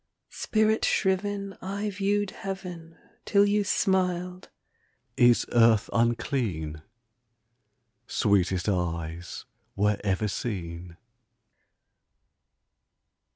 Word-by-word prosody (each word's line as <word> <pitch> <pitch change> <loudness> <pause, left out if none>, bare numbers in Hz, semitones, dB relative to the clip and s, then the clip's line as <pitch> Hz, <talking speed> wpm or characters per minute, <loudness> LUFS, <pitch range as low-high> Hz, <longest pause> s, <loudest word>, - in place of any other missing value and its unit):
Spirit 220 0 +1
shriven 200 0 0
I 200 +2 -3
viewed 205 +1 0
Heaven, 180 -4 -7 0.3
Till 200 -1 +4
you 205 0 +2
smiled 180 -2 0 0.7
"Is 120 -1 +5
earth 115 -3 +4
unclean, 115 - -1 1.3
Sweetest 95 -2 +1
eyes 85 -3 -3 0.3
were 105 0 +1
ever 100 +1 0
seen?" 85 -5 -5
125 Hz, 70 wpm, -27 LUFS, -, 1.3 s, Is